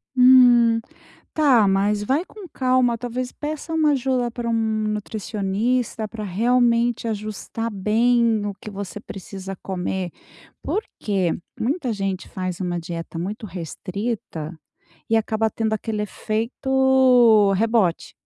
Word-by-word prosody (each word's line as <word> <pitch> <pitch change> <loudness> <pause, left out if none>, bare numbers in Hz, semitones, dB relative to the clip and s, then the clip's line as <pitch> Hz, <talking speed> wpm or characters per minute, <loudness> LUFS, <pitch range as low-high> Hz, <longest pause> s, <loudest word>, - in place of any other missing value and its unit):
Hum. 245 -2 +6 0.5
Tá, 255 -10 +4
mas 205 +2 +1
vai 275 - 0
com 400 -4 -12
calma, 255 -2 +2
talvez, 245 +1 -4
peça 310 +2 -5
uma 310 -2 +3
ajuda 255 -2 0
para 235 0 -4
um - - 0 0.4
nutricionista, 215 +2 -2
pra 215 -1 -6
realmente 235 +3 +2
ajustar 215 +1 -4
bem 225 +2 +2
o 205 - -2
que - - -8
você 200 0 -6
precisa 195 -1 -8
comer. 185 -1 -3 0.5
Por 430 - -1 0.2
que? 190 -5 0 0.3
Muita 260 +1 -1
gente 195 -3 -3
faz 185 -2 -4
uma 175 -2 -2
dieta 165 0 -6
muito 205 +6 -4
restrita 180 -1 -5 0.5
e 225 - +3
acaba 220 0 0
tendo 220 -1 -1
aquele 215 0 -2
efeito 245 0 +3
rebote. 220 -5 +1
220 Hz, 120 wpm, -22 LUFS, 195-245 Hz, 0.5 s, Hum